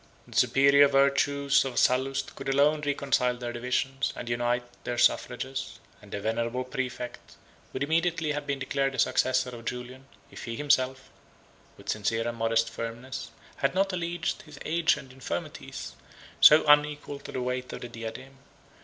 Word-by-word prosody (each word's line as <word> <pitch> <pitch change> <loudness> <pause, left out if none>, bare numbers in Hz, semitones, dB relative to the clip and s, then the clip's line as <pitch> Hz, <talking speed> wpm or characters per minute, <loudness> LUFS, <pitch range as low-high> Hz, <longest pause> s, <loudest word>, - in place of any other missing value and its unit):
The - - -13
superior 140 +1 +6
virtues 140 0 +3
of 130 -3 -5
Sallust 135 +2 +1
could 135 0 -5
alone 145 +3 +3
reconcile 135 -3 +1
their 120 -1 -5
divisions, 125 +3 -1
and 120 - -7
unite 120 0 0 0.2
their 120 0 -3
suffrages; 130 +1 0 0.2
and 105 - -15
the 100 - -3
venerable 115 +4 -1
præfect 125 -1 -5 0.4
would - - -2
immediately 165 +1 +1
have 145 0 -4
been 140 -1 -1
declared 135 0 -1
the - - -7
successor 130 +1 +2
of 115 -1 -10
Julian, 125 +2 -6 0.2
if - - -9
he 115 -1 -4
himself, 130 -1 +1 0.7
with 100 0 -11
sincere 115 +2 0
and 120 0 -4
modest 115 0 +2
firmness, 115 +4 -6 0.3
had 135 +5 0
not 195 0 +1
alleged 175 -1 -2
his 150 -2 -14
age 165 +1 +2
and 130 -1 -11
infirmities, 90 - -6 0.5
so 150 +1 +8
unequal 145 -1 +3
to - - -9
the 130 - -3
weight 125 0 -3
of - - -7
the 120 - -5
diadem. 120 +4 -8
130 Hz, 160 wpm, -28 LUFS, 120-140 Hz, 0.7 s, so